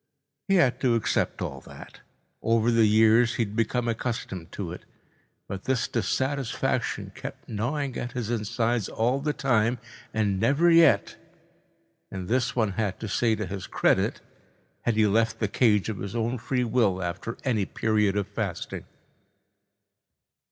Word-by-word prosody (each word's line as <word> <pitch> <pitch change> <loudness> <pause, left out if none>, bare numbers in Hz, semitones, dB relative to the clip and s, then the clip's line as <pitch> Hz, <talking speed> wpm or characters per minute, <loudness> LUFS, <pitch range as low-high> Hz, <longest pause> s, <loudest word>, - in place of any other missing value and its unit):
He 195 - +3
had 135 -9 +3
to 125 -3 +3
accept 115 - 0
all - - -5
that. - - -13 0.4
Over 115 +1 +2
the 115 -2 +4
years 110 +2 +4
he 115 - +1
had 105 -1 -6
become 115 +2 0
accustomed 110 -7 -3
to 90 -5 -4
it. 90 - -8 0.6
But 95 0 -6
this 130 -3 +1
dissatisfaction 130 +3 -1
kept - - -9
gnawing 130 +5 -2
at 120 - -5
his 120 -3 -3
insides 115 0 -1
all 125 +4 0
the 150 +2 0
time 125 -4 +1 0.3
and 105 -3 0
never 145 - +3
yet—and 140 - -1
this 125 +2 0
one 110 -5 +1
had 100 -1 -2
to 110 - -5
say 110 +2 +1
to 110 0 -3
his 95 +1 -6
credit—had 120 - -2
he 110 0 +4
left 115 +2 +2
the 105 - 0
cage 105 -2 +2
of 110 -3 -4
his 100 +2 -5
own 120 +2 -1
free 125 +2 -1
will 110 -6 +1
after 90 +7 -4
any 110 -7 +1
period 105 -2 +1
of 100 -1 -1
fasting. 100 -4 -4
115 Hz, 150 wpm, -26 LUFS, 105-125 Hz, 0.6 s, the